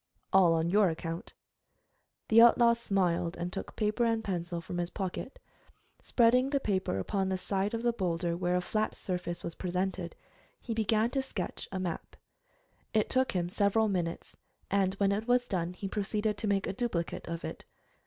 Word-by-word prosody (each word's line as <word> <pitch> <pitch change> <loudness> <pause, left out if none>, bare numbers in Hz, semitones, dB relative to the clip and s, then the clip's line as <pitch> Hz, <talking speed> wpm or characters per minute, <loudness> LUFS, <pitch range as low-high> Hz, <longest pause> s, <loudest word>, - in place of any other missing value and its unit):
"All 180 -3 +6
on 165 +1 0
your 205 -1 +5
account." 165 +1 -5 0.9
The 230 +1 +8
outlaw 235 0 +7
smiled, 185 -7 0
and 175 +1 -4
took - - -6
paper 215 +2 +1
and 225 -1 +1
pencil 175 -3 -3
from 175 +1 -5
his 175 0 -1
pocket. 190 +7 -5 0.6
Spreading 250 +2 +3
the 280 -1 +1
paper 190 - -1
upon 190 - -1
the 190 - 0
side 195 +3 -1
of 230 - -4
the 240 -1 +2
boulder 175 -4 -1
where 180 0 0
a 180 - +2
flat 215 +4 -1
surface 180 -2 -4
was 170 - -4
presented, 185 0 -3 0.4
he 230 - -4
began 220 +1 +2
to 270 - +1
sketch 210 -9 -5
a 190 - -3
map. 180 -3 -4 0.8
It 215 - +2
took 260 0 +2
him 175 -2 0
several 205 +4 +2
minutes, 175 -4 -3 0.4
and 195 -1 +2
when 195 0 +2
it 210 +3 -1
was 245 0 +3
done 180 -4 -2
he 195 +2 -5
proceeded 210 +2 -1
to 220 - -2
make 200 -1 +1
a - - -2
duplicate 195 -6 -2
of 170 0 -4
it. - - -7
195 Hz, 180 wpm, -31 LUFS, 175-220 Hz, 0.9 s, The